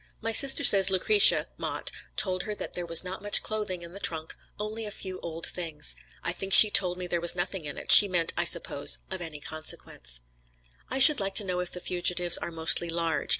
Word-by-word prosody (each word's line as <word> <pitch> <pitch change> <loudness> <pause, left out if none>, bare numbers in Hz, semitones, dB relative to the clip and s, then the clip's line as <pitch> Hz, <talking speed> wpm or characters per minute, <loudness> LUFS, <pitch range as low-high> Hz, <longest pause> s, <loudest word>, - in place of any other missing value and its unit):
"My 225 0 -5
sister 270 +4 +3
says 195 -1 +8
Lucretia 195 +2 +2
(Mott) - - -4 0.2
told 185 -2 -2
her 210 - -7
that - - -9
there 175 -1 -4
was 165 +1 +1
not 185 +1 -9
much 205 0 +2
clothing 210 -5 -6
in 170 - -13
the 200 - -9
trunk, 160 -4 -1 0.2
only 215 +2 -7
a - - -7
few 190 -3 -8
old 165 0 -8
things. 160 - -2 0.3
I - - -3
think 195 0 -7
she 215 - +7
told 180 -3 0
me 180 - -8
there 175 -1 -5
was 170 0 +1
nothing 175 -1 -6
in 145 - -9
it, - - -3
she 205 - +8
meant, 175 -3 -1
I 175 - -2
suppose, 170 -4 +1
of 190 -1 -6
any 160 -3 -10
consequence. 60 - -6 0.7
"I 265 - -4
should 295 +3 +9
like 195 -1 -6
to - - +2
know 180 -2 -5
if 180 -1 -6
the 180 - -6
fugitives 175 -1 0
are - - -8
mostly 165 +1 +2
large. 165 -2 -4
180 Hz, 220 wpm, -24 LUFS, 170-195 Hz, 0.7 s, should